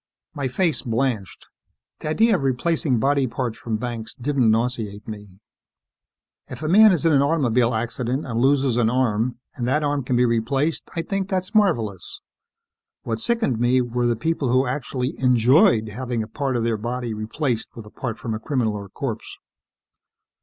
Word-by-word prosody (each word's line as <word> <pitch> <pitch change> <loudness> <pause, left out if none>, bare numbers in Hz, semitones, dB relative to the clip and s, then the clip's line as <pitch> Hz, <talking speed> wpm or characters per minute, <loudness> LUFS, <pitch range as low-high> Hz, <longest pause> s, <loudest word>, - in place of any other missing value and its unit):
My 140 -2 -2
face 165 +5 0
blanched. 115 -5 -2 0.5
The - - -6
idea 220 +7 +3
of 175 - -1
replacing 135 +1 0
body 140 +1 +2
parts 120 -2 -4
from 110 -2 -2
Banks 115 -1 -5
didn't 130 -2 +1
nauseate 110 -2 -1
me. 105 -2 -8 1.2
If - - -8
a - - -1
man 210 +5 +7
is 170 -3 0
in 165 - +5
an 140 -2 +4
automobile 125 -6 +2
accident 120 +4 -2
and 115 -3 -2
loses 135 -1 +2
an 115 -2 +3
arm, 120 -1 0 0.2
and 120 -4 -3
that 150 +4 +1
arm 145 -1 0
can 125 0 -1
be 125 +1 +4
replaced, 130 +7 0
I 165 - -1
think 195 +2 -3
that's 185 +1 -2
marvelous. 120 - 0 0.8
What 115 -1 -3
sickened 220 - 0
me 120 +2 +3
were 120 0 0
the 120 - +1
people 140 +1 -1
who 130 +2 +3
actually 125 0 -3
enjoyed 120 -2 +4
having 120 +1 -3
a - - -8
part 135 +3 -2
of 115 - -1
their 115 -1 0
body 120 +1 -3
replaced 110 +3 -2
with 115 - -9
a 105 - -13
part 120 -4 -5
from 115 - -4
a 110 - -3
criminal 120 -4 -1
or 100 -1 -7
corpse. - - -5
125 Hz, 175 wpm, -23 LUFS, 115-145 Hz, 1.2 s, man